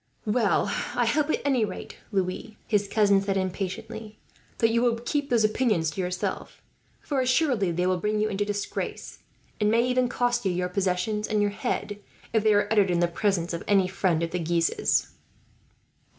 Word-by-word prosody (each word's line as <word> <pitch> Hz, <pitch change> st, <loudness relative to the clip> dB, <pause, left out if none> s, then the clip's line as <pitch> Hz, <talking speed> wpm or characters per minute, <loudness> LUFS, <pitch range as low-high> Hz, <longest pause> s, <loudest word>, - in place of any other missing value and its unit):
"Well, 215 Hz, -1 st, +2 dB, 0.3 s
I 245 Hz, -, +2 dB
hope 290 Hz, +6 st, +1 dB
at -, -, 0 dB
any 265 Hz, -5 st, +2 dB
rate, 195 Hz, -3 st, -6 dB
Louis," 195 Hz, +3 st, -2 dB
his 205 Hz, -2 st, +1 dB
cousin 200 Hz, -2 st, +3 dB
said 195 Hz, 0 st, -1 dB
impatiently, 210 Hz, +4 st, -4 dB, 0.4 s
"that 225 Hz, -1 st, +3 dB
you 235 Hz, +1 st, +2 dB
will 240 Hz, -1 st, +2 dB
keep 285 Hz, +4 st, -2 dB
these 235 Hz, -3 st, +3 dB
opinions 215 Hz, -7 st, +1 dB
to 190 Hz, -, -4 dB
yourself; 180 Hz, 0 st, -4 dB, 0.4 s
for 280 Hz, -3 st, -1 dB
assuredly 255 Hz, -, +2 dB
they 180 Hz, +2 st, 0 dB
will 185 Hz, 0 st, +1 dB
bring 210 Hz, +3 st, 0 dB
you 215 Hz, -, +2 dB
into 205 Hz, -1 st, -1 dB
disgrace, 205 Hz, 0 st, -4 dB, 0.4 s
and 210 Hz, -1 st, +2 dB
may 230 Hz, +2 st, +3 dB
even 250 Hz, 0 st, +1 dB
cost 245 Hz, -1 st, 0 dB
you 190 Hz, -, +1 dB
your 180 Hz, 0 st, -1 dB
possessions 195 Hz, +3 st, -1 dB
and 215 Hz, -, 0 dB
your 205 Hz, 0 st, +2 dB
head, 205 Hz, 0 st, -3 dB, 0.3 s
if 220 Hz, -2 st, +2 dB
they 215 Hz, -1 st, +4 dB
are 205 Hz, -, +2 dB
uttered 205 Hz, -3 st, +4 dB
in 175 Hz, -1 st, +1 dB
the 175 Hz, -, +3 dB
presence 175 Hz, -1 st, -1 dB
of 170 Hz, -, -4 dB
any 195 Hz, -3 st, +4 dB
friend 180 Hz, -3 st, 0 dB
of 165 Hz, -, -2 dB
the 180 Hz, -, -2 dB
Guises." 165 Hz, 0 st, +1 dB
205 Hz, 185 wpm, -26 LUFS, 185-230 Hz, 0.4 s, they